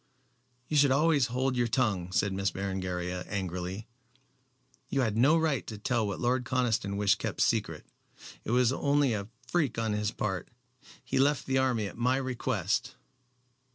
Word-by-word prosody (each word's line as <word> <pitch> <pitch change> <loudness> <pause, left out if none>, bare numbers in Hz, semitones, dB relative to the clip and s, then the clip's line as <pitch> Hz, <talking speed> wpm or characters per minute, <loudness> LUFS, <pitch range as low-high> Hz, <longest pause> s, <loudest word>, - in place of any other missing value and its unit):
"You 155 - -2
should 140 -1 +6
always 145 -1 +3
hold 130 +2 -1
your 120 -1 +1
tongue," 105 -8 0
said 100 +1 +1
Miss 95 0 0
Berengaria, 90 -2 -3
angrily. 95 +1 -4 1.0
"You 135 - +1
had 110 -4 0
no 140 +8 +5
right 155 -6 0
to 110 - -6
tell 115 0 0
what 100 - -4
Lord 125 +1 +1
Conniston 120 -5 0
wished 100 -1 +3
kept - - -4
secret. - - 0 0.6
It - - -7
was 125 +1 +3
only 140 -2 +2
a 100 -2 -3 0.2
freak 145 -6 0
on 110 -2 0
his 105 0 0
part. 100 -4 -3 0.5
He - - -1
left 145 +1 +2
the 130 0 +1
army 125 -5 +1
at 100 - -8
my 125 +2 +2
request." 125 -3 -1
120 Hz, 160 wpm, -29 LUFS, 100-130 Hz, 1.0 s, should